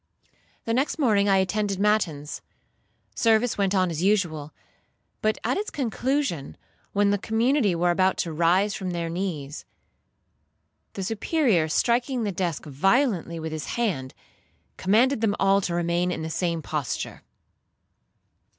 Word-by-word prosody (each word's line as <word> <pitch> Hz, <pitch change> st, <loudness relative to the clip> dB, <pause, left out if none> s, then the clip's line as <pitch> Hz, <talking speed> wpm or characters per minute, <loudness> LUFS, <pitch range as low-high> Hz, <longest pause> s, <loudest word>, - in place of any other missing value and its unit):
The 230 Hz, -, 0 dB
next 265 Hz, +7 st, 0 dB
morning 210 Hz, -9 st, +3 dB
I 195 Hz, -, +5 dB
attended 195 Hz, +1 st, 0 dB
matins. 190 Hz, -8 st, 0 dB, 0.7 s
Service 225 Hz, +1 st, +2 dB
went 200 Hz, -1 st, +1 dB
on 185 Hz, -2 st, +2 dB
as 160 Hz, 0 st, -3 dB
usual, 175 Hz, -7 st, 0 dB, 0.7 s
but 215 Hz, 0 st, +1 dB
at -, -, 0 dB
its 420 Hz, +2 st, -2 dB
conclusion, 255 Hz, -, -2 dB, 0.3 s
when 205 Hz, 0 st, +2 dB
the 205 Hz, -, +1 dB
community 225 Hz, -1 st, +1 dB
were 175 Hz, +1 st, +2 dB
about 185 Hz, +1 st, +2 dB
to 165 Hz, -, -5 dB
rise 180 Hz, +6 st, +2 dB
from 185 Hz, -2 st, -4 dB
their 170 Hz, -1 st, -2 dB
knees, 165 Hz, -6 st, -4 dB, 1.3 s
the 195 Hz, -, -4 dB
Superior, 225 Hz, -, +1 dB
striking 240 Hz, -, +1 dB
the 205 Hz, -, -1 dB
desk 175 Hz, -3 st, -3 dB
violently 175 Hz, -, +1 dB
with 160 Hz, 0 st, -5 dB
his 155 Hz, -1 st, -4 dB
hand, 160 Hz, -, -2 dB, 0.6 s
commanded 225 Hz, +6 st, +2 dB
them 210 Hz, -3 st, +2 dB
all 195 Hz, 0 st, +4 dB
to 175 Hz, -2 st, -2 dB
remain 175 Hz, +1 st, 0 dB
in 160 Hz, -, -4 dB
the 160 Hz, -, -4 dB
same 170 Hz, -2 st, -1 dB
posture. 150 Hz, -6 st, -4 dB
195 Hz, 140 wpm, -25 LUFS, 170-220 Hz, 1.3 s, I